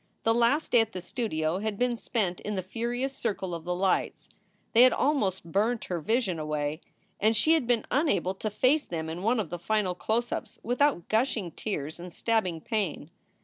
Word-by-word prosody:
The 225 - +4
last 240 +7 +2
day 240 - +6
at 225 0 -3
the 185 - -4
studio 175 -5 -2
had 215 -1 -2
been 245 +1 +1
spent 210 -6 -2
in 210 0 -4
the 185 - -2
furious 240 +7 -3
circle 195 -7 -2
of 165 -1 -6
the 180 0 -1
lights. 190 +1 0 0.4
They 230 - +7
had 255 0 +8
almost 195 - 0
burnt 220 +5 +1
her 175 -2 -2
vision 195 0 0
away, 150 +1 -2 0.4
and 220 +2 +3
she 310 +10 +4
had 310 -7 +1
been 240 -2 +2
unable 205 - +2
to 215 +3 -3
face 255 +8 +2
them 160 -2 -4
in 170 +2 -5
one 230 +4 +2
of 180 -7 -3
the 175 - -4
final 195 +1 0
close 225 +6 -1
ups - - -4
without 245 - +1
gushing 220 -5 0
tears 155 -7 -4
and 180 +1 -8
stabbing 185 -5 0
pain. 185 -8 -2
210 Hz, 195 wpm, -28 LUFS, 175-240 Hz, 0.4 s, had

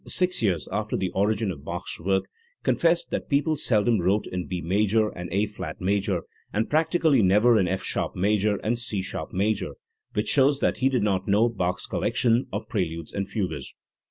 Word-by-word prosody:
six 180 -4 +1
years 95 -8 0
after - - -1
the 95 - -2
origin 105 +1 +1
of 70 -5 -9
Bach's - - -5
work 95 +3 +1 0.4
confessed 170 0 +2
that - - -3
people 145 +2 +2
seldom 115 -4 +2
wrote 100 +4 +1
in 90 -1 -4
B 90 -1 -3
major 105 +5 +2
and 90 -3 -7
A 100 +4 +2
flat 100 -7 -7
major, 95 -2 0 0.3
and 110 +2 -1
practically 160 -3 +3
never 105 +4 +5
in 95 - +2
F 95 +1 -2
sharp - - -1
major 105 +2 +2
and 115 +2 0
C 110 -6 -3
sharp - - -5
major*; 100 0 -1 0.4
which 105 - -1
shows 140 0 +4
that - - +1
he 130 +1 +2
did 125 -5 +1
not 95 -2 0
know 105 +4 +4
Bach's 90 -5 -2
collection 120 +1 +1
of - - -4
preludes 85 -6 -3
and 100 -1 -2
fugues. 90 - -4
105 Hz, 185 wpm, -25 LUFS, 95-120 Hz, 0.4 s, never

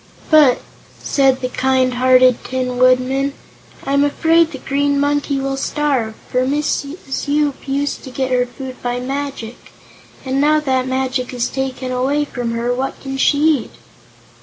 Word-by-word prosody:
"But," 295 -5 +6 0.4
said 270 -2 +2
the 255 - -1
kind 260 0 +1
hearted 255 0 +4
Tin 255 -1 -3
Woodman, 255 +2 +2 0.5
"I'm 280 +1 +2
afraid 325 +3 +3
the 275 - -6
Green 280 +1 0
Monkey 285 -1 0
will 270 0 -2
starve, 270 -6 -1
for 250 - 0
Mrs. 285 +1 -2
Yoop 290 -1 0
used 280 +1 -2
to - - -7
get 260 0 -3
her 250 -1 +2
food 260 +1 -9
by 245 0 -2
magic, 270 -3 -5 0.5
and 265 +1 0
now 305 +1 +4
that 265 -4 0
the 255 - -5
magic 260 -1 -2
is 240 -1 -1
taken 265 -1 -4
away 270 +4 0
from 245 -4 -4
her, 235 +1 -1
what 265 +2 -3
can 270 -1 -6
she 285 +2 +3 0.2
eat?" - - -10
265 Hz, 160 wpm, -18 LUFS, 255-285 Hz, 0.5 s, But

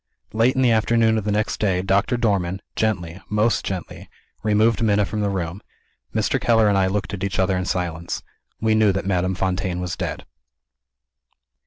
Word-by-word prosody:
Late 115 +4 +3
in 130 - +2
the 120 - +4
afternoon 110 0 +3
of 105 - -7
the 105 - 0
next 105 +4 0
day, 95 -3 +1
Doctor 100 +6 +1
Dormann, 95 -5 0
gently, 90 -5 -1
most 105 +2 +1
gently, 95 -2 -6 0.3
removed 110 +1 +2
Minna 105 -2 +3
from 105 +1 -3
the 100 - +1
room. 90 0 -3 0.5
Mr. - - 0
Keller 115 -2 +4
and 100 - +3
I 95 -1 +3
looked 105 +2 -2
at 95 -2 -4
each 100 - -2
other 95 0 +2
in 90 0 -1
silence. 85 -3 -3 0.4
We 110 0 +2
knew 110 -2 +4
that 95 0 -3
Madame 95 -1 0
Fontaine 95 -1 -1
was 90 -1 -3
dead. - - -4
100 Hz, 180 wpm, -22 LUFS, 95-110 Hz, 0.5 s, the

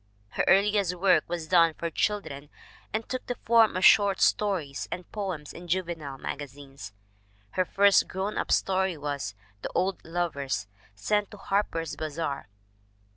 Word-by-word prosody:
Her - - -1
earliest 200 -2 +3
work 185 +1 +3
was 170 -2 -4
done 165 -2 +4
for 170 -1 -4
children 150 -9 -2 0.4
and 220 +1 -3
took 255 -1 -5
the 245 - -2
form 225 -4 +3
of 185 - +2
short 200 -2 +6
stories 175 -10 +1
and 180 -1 -6
poems 185 -8 -5
in 175 +1 -10
juvenile 165 -6 -3
magazines. 135 -6 -8 0.6
Her 185 - +1
first 200 +2 +4
grown 195 +3 -3
up - - -2
story 190 -2 +1
was 140 -9 -4 0.3
The - - -4
Old 190 +1 0
Lovers, 150 -10 -2 0.3
sent 205 - 0
to 210 - -12
Harper's 195 -6 -1
Bazar. 155 -6 -4
175 Hz, 145 wpm, -27 LUFS, 145-195 Hz, 0.6 s, short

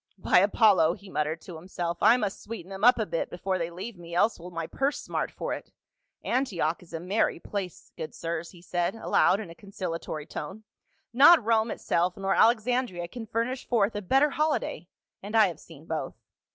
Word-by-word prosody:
"By 185 - +4
Apollo!" 200 -4 +4
he 200 -1 -14
muttered 155 +2 -1
to 175 -4 -9
himself, 170 0 -4
"I 225 +3 +6
must 205 -5 -3
sweeten 205 -4 -8
them 195 +1 -7
up 245 +2 +7
a 220 - 0
bit 165 -3 -2
before 185 +1 -2
they 165 0 -2
leave 185 +4 -8
me, 170 0 -8
else 210 +4 +2
will 175 +2 -9
my 165 -2 -4
purse 275 - -1
smart - - -3
for - - -4
it. - - -8 0.5
Antioch 185 - 0
is 175 - -17
a 165 - -4
merry 185 +1 0
place, 190 -1 -6
good 155 - -7
sirs," 170 0 -4
he 175 -2 -16
said 175 +2 -1
aloud 205 -3 +3
in 195 -6 -7
a - - -9
conciliatory 165 -5 -6
tone; 190 +8 -7 0.3
" - - -44
not 330 -7 +8
Rome 225 0 +2
itself 175 -2 0
nor 195 0 0
Alexandria 230 -5 +2
can 225 +2 -8
furnish 235 +4 -2
forth 220 -3 +2
a 205 - -2
better 270 +9 +3
holiday 305 +2 -1 0.2
— - - -65
and 205 +3 -6
I 220 -1 +7
have 165 -3 -9
seen 160 -2 -14
both. 160 -5 -4
190 Hz, 205 wpm, -27 LUFS, 170-225 Hz, 0.5 s, not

